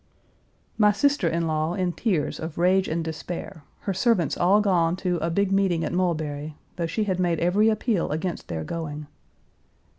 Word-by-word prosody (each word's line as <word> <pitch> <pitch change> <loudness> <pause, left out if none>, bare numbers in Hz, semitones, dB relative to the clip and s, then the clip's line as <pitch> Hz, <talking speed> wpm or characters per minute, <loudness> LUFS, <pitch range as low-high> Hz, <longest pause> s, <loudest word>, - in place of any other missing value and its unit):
My 210 -1 +6
sister 245 -1 +2
in 165 0 0
law 155 +1 0
in 180 -2 -1
tears 170 -10 -1
of 160 0 -6
rage 185 +2 +3
and 165 +1 -1
despair, 165 +2 -6 0.2
her 195 - -2
servants 190 - +2
all 190 +4 +4
gone 175 -5 +2
to 180 -1 -1
"a 165 +1 -1
big 195 +3 +1
meeting 190 -4 +2
at - - -3
Mulberry," 155 -4 -2 0.2
though 170 -2 -2
she 215 +7 -1
had 190 -3 -1
made 175 -3 +1
every 200 +6 +3
appeal 215 -3 0
against 160 +4 -3
their 80 -1 -4
going. 150 - -5
175 Hz, 175 wpm, -25 LUFS, 160-195 Hz, 0.2 s, My